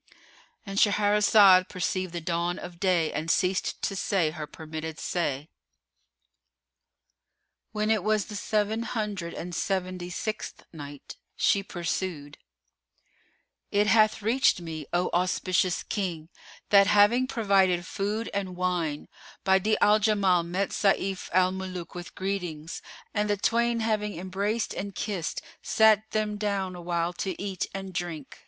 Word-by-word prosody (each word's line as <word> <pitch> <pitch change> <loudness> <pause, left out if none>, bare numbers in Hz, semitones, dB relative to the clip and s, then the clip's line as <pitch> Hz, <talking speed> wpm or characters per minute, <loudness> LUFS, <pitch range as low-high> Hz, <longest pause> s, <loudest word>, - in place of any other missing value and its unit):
——And 195 0 -2
Shahrazad 205 -2 +5
perceived 185 0 -2
the 170 - -4
dawn 170 +2 -1
of 175 -1 -9
day 175 -4 +2
and 155 +2 -3
ceased 185 +1 +1
to 195 - -1
say 185 -5 +1
her 155 -2 -6
permitted 160 0 -7
say. 150 -5 -2 2.2
When 215 0 0
it 215 -4 +1
was 215 -1 +1
the 210 - -8
Seven 215 +2 0
Hundred 210 -7 -3
and 175 +1 -6
Seventy 185 -1 -2
sixth 215 +4 -5
Night, 145 -3 -9 0.2
She 200 - +3
pursued, 170 -5 -4 1.3
It 205 +1 +2
hath 215 -1 +3
reached 235 -1 +3
me, 160 -3 -6
O 175 +1 0
auspicious 180 0 +1
King, 175 -6 -3 0.4
that 200 -1 +6
having 210 +6 +5
provided 195 -7 +2
food 210 +4 -2
and 195 -2 -3
wine, 175 -5 -1 0.4
Badi'a 190 +3 +3
al 210 +1 +5
Jamal 200 -4 +3
met 180 +4 -2
Sayf 195 -1 0
al 185 +1 +4
Muluk 185 -2 -6
with 175 -1 -8
greetings, 180 -4 -4 0.3
and 210 -1 0
the 205 - +1
twain 235 +3 +1
having 210 -3 -1
embraced 200 +5 -2
and 200 0 -5
kissed 195 -6 -3 0.2
sat 220 0 +4
them 215 -1 -1
down 200 -3 -2
awhile 175 0 -2
to 185 0 -4
eat 195 -2 -3
and 195 -1 -6
drink. 165 -5 -5
190 Hz, 135 wpm, -27 LUFS, 175-210 Hz, 2.2 s, that